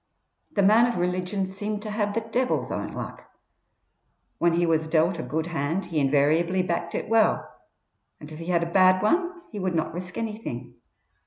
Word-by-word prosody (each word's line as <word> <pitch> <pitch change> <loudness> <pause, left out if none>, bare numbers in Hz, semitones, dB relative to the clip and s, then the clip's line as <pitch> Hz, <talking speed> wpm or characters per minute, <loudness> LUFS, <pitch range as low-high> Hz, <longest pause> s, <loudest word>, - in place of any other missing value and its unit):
The 200 - +2
man 220 +4 +6
of 240 - -2
religion 180 +2 -1
seemed 205 +2 -4
to 215 - -5
have 210 -1 -1
the 230 - +1
Devil's 245 +3 -1
own - - -2
luck. - - -8 1.1
When 170 0 +3
he 175 +1 +2
was 160 -1 +1
dealt 165 +2 +2
a - - -1
good 160 +1 -2
hand 165 +2 -2
he 165 -3 -1
invariably 155 +6 +2
backed 170 -1 -2
it - - -3
well, 225 0 +3 0.7
and 150 +1 -11
if 155 - -9
he 165 - -7
had 170 -2 +2
a 170 - -4
bad 185 0 +5
one 345 +11 +2 0.2
he 210 - -5
would 185 -2 -1
not 160 -1 -1
risk 180 +1 -6
anything. 215 - -5
180 Hz, 185 wpm, -26 LUFS, 165-210 Hz, 1.1 s, man